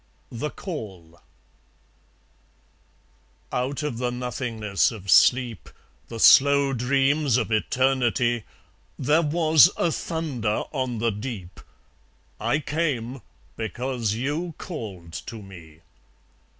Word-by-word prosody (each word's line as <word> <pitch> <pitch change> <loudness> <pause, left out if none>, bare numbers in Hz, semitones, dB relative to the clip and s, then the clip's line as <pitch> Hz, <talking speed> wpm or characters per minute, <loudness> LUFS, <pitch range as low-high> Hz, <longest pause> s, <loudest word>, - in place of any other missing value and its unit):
The 125 +6 -3
Call 95 - -8 2.3
Out 130 +4 -2
of 125 -6 -3
the 125 -1 0
nothingness 120 -5 -1
of 100 -4 -5
sleep, 125 -4 +4 0.4
The 115 - -7
slow 140 +2 +6
dreams 135 +2 +2
of 115 -2 -2
Eternity, 120 0 +1 0.5
There 150 +5 +3
was 155 -3 +5
a 170 - +1
thunder 140 -12 -2
on 130 -4 -2
the 115 +1 +1
deep: 105 -4 -7 0.8
I 150 - +1
came, 140 -5 -2 0.3
because 115 -1 -2
you 150 +7 -3
called 100 - -8
to 115 - -6
me. 85 -6 -13
125 Hz, 100 wpm, -24 LUFS, 110-140 Hz, 2.3 s, slow